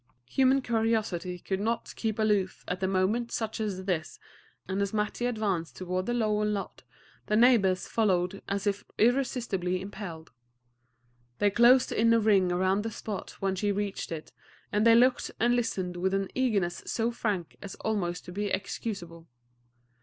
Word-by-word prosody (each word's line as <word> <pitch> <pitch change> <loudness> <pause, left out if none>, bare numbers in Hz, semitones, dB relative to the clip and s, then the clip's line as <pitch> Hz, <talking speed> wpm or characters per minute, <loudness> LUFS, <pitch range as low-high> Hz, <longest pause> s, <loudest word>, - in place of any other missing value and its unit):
Human 265 0 +3
curiosity 220 -7 0
could 190 +2 -3
not 225 +3 -2
keep 220 -2 -2
aloof 205 -4 0
at 180 +1 -3
a 190 - +1
moment 195 +6 +1
such 220 -1 -3
as 195 -4 -3
this, 170 -5 -2 0.5
and 190 +1 -1
as 200 +1 -1
Mattie 210 +3 -1
advanced 205 -8 -2
toward 185 0 -3
the 240 - 0
Lovell 215 -2 +1
lot, 205 -2 -3 0.5
the 210 - +1
neighbors 215 -6 +4
followed 190 -3 +1
as 200 0 -2
if 200 0 0
irresistibly 230 -7 +1
impelled. 190 -4 -8 1.1
They 205 -1 +3
closed 240 +4 +5
in 230 +1 +3
a - - +4
ring 200 -4 +3
around 185 +3 +2
the 225 - -2
spot 210 -2 -6
when 195 -1 +1
she 205 +2 0
reached 200 -2 -3
it, 160 -2 -6 0.4
and 210 +2 +3
they 230 - +8
looked 250 +2 +4
and 240 +1 +3
listened 190 -7 -2
with 190 +2 0
an 195 -1 -1
eagerness 200 -9 0
so 230 +1 0
frank 205 -7 -2
as 200 - -7
almost 180 -5 -2
to - - -8
be 205 +3 -2
excusable. 175 -4 -4
205 Hz, 160 wpm, -29 LUFS, 185-225 Hz, 1.1 s, they